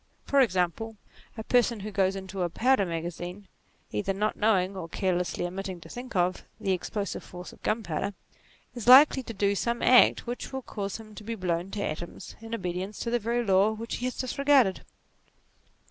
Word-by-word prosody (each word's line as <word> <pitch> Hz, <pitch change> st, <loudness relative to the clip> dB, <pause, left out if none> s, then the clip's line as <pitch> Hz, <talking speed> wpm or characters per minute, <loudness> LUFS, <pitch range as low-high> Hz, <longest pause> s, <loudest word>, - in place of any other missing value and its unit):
For 280 Hz, -, +3 dB
example, 210 Hz, +1 st, 0 dB, 0.4 s
a 220 Hz, -, -4 dB
person 240 Hz, -2 st, +2 dB
who 210 Hz, +2 st, -5 dB
goes 195 Hz, -1 st, +1 dB
into 190 Hz, 0 st, -5 dB
a 175 Hz, -, +1 dB
powder 240 Hz, +1 st, +2 dB
magazine 175 Hz, +3 st, -5 dB, 0.4 s
either 105 Hz, -, -1 dB
not 210 Hz, +2 st, -1 dB
knowing, 200 Hz, -3 st, +2 dB
or 170 Hz, -3 st, -6 dB
carelessly 180 Hz, -1 st, -1 dB
omitting 185 Hz, 0 st, -5 dB
to -, -, -12 dB
think 250 Hz, -1 st, -8 dB
of, 180 Hz, 0 st, +1 dB, 0.2 s
the 190 Hz, -, 0 dB
ex 180 Hz, -, -4 dB
plosive 205 Hz, -3 st, -3 dB
force 180 Hz, 0 st, -10 dB
of -, -, -18 dB
gunpowder, 200 Hz, -2 st, -2 dB, 0.6 s
is 240 Hz, -2 st, -7 dB
likely 265 Hz, +2 st, +8 dB
to 235 Hz, -, -8 dB
do 200 Hz, 0 st, +2 dB
some 235 Hz, +4 st, -1 dB
act 250 Hz, -1 st, +6 dB
which 240 Hz, +1 st, -5 dB
will 265 Hz, -1 st, -5 dB
cause 200 Hz, -4 st, -4 dB
him 215 Hz, -1 st, -12 dB
to 210 Hz, -, -10 dB
be 230 Hz, +2 st, -4 dB
blown 180 Hz, -2 st, -2 dB
to 200 Hz, 0 st, -3 dB
atoms 170 Hz, +1 st, -6 dB
in 225 Hz, 0 st, -8 dB
obedi 180 Hz, -4 st, -3 dB
ence 200 Hz, +3 st, -6 dB
to 235 Hz, -, -2 dB
the 240 Hz, -, +2 dB
very 235 Hz, +2 st, -1 dB
law 195 Hz, +2 st, +4 dB
which 225 Hz, +1 st, -5 dB
he 245 Hz, -, -4 dB
has 255 Hz, -, -3 dB
disregarded. 265 Hz, -5 st, +2 dB
200 Hz, 190 wpm, -28 LUFS, 185-230 Hz, 0.6 s, likely